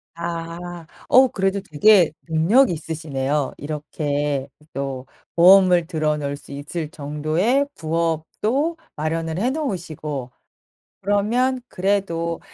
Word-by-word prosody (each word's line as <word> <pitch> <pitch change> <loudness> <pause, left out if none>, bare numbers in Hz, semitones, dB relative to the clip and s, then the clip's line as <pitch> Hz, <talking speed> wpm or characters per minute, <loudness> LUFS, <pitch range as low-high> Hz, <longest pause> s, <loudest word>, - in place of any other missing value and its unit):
아. 170 0 -6 0.2
어 260 +1 +7
그래도 195 -3 -1
되게 190 +1 +5 0.2
능력 170 +12 +4
있으시네요. 150 -4 -2
이렇게 145 -2 -2 0.3
또 135 -2 -4 0.3
보험을 180 -1 +6
들어 155 -3 0
놓을 140 -1 -3
수 - - -15
있을 150 +3 -5
정도의 155 - 0
부업도 170 - -1 0.2
마련을 160 +1 -2
해 235 +5 +1
놓으시고 160 - -4 0.7
그러면 230 +6 +1
그래도 180 -4 -1
165 Hz, 230 characters per minute, -22 LUFS, 150-195 Hz, 0.7 s, 어